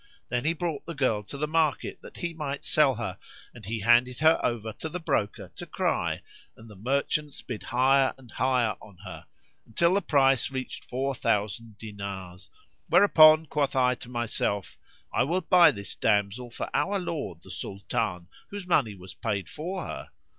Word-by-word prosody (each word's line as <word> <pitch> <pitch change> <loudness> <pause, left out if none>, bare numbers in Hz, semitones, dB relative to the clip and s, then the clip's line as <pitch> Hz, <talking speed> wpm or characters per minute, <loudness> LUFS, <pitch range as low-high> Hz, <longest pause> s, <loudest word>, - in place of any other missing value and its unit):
Then 120 +2 -1
he 165 - +3
brought 165 -3 -4
the 170 - -5
girl 130 -6 +1
to 140 - -8
the 150 +2 -1
market 155 -2 0
that - - -12
he 170 -1 -3
might 145 -3 -4
sell 145 -4 +4
her, 105 -5 -5 0.3
and 120 - -13
he 110 0 -3
handed 120 +3 +4
her 160 +1 +5
over 110 -2 -1
to 160 - -6
the 180 - -4
broker 105 - -2
to - - -7
cry - - -1 0.3
and 110 - -14
the 105 - -13
merchants 140 +6 -1
bid 120 -5 -6
higher 130 +2 +3
and 130 -3 -16
higher 125 -4 +1
on 100 -4 -15
her, - - -9 0.4
until 170 +10 +2
the 200 - +2
price 135 - +3
reached 130 -1 -6
four 135 +2 -2
thousand 105 -1 -1
dinars; 100 -4 -8 0.4
whereupon 155 -5 +7
quoth 145 -2 -1
I 125 -1 +4
to 125 -1 -10
myself, 115 -4 -2 0.4
'I - - +3
will 175 +6 0
buy 175 -1 +7
this 100 -8 -4
damsel 105 +3 +1
for 120 - -5
our 200 +1 +1
lord 145 - -4
the - - -11
Sultan, 90 -3 -3 0.2
whose 200 -2 -6
money 135 - +2
was 90 0 -10
paid 100 -6 -3
for 180 +4 -5
her.' - - -7
125 Hz, 175 wpm, -27 LUFS, 105-155 Hz, 0.4 s, whereupon